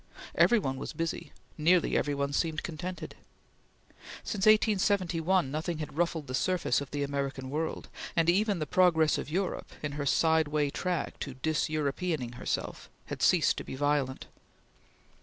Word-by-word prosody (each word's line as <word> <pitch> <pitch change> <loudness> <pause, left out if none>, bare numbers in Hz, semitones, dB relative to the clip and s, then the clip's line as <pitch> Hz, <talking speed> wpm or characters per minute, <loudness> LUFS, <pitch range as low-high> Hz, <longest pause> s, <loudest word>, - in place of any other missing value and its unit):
Every 240 - +5
one 135 -10 -2
was - - -5
busy; 165 0 -3 0.3
nearly 170 +3 +3
every 145 -1 +1
one 140 0 -1
seemed 160 0 0
contented. 175 +1 -6 1.1
Since 200 -1 -1
1871 190 - +3
nothing 155 +3 -2
had 150 -2 -6
ruffled 165 -2 0
the 130 - -7
surface 180 +2 +1
of 140 - -6
the 145 -1 -2
American 135 -2 -3
world, 160 +2 -3 0.3
and 165 -1 +2
even 200 +3 +3
the 155 - -2
progress 160 -1 +3
of - - -5
Europe 185 +4 -2
in 145 - -2
her 145 0 -3
side 160 +1 +3
way 145 -1 0
track 180 +2 -2
to 135 -3 -5
dis 155 +5 0
Europeaning 150 -3 -2
herself - - -3 0.2
had - - -6
ceased - - +4
to - - -4
be - - -7
violent. 145 -1 0
155 Hz, 160 wpm, -30 LUFS, 140-180 Hz, 1.1 s, Every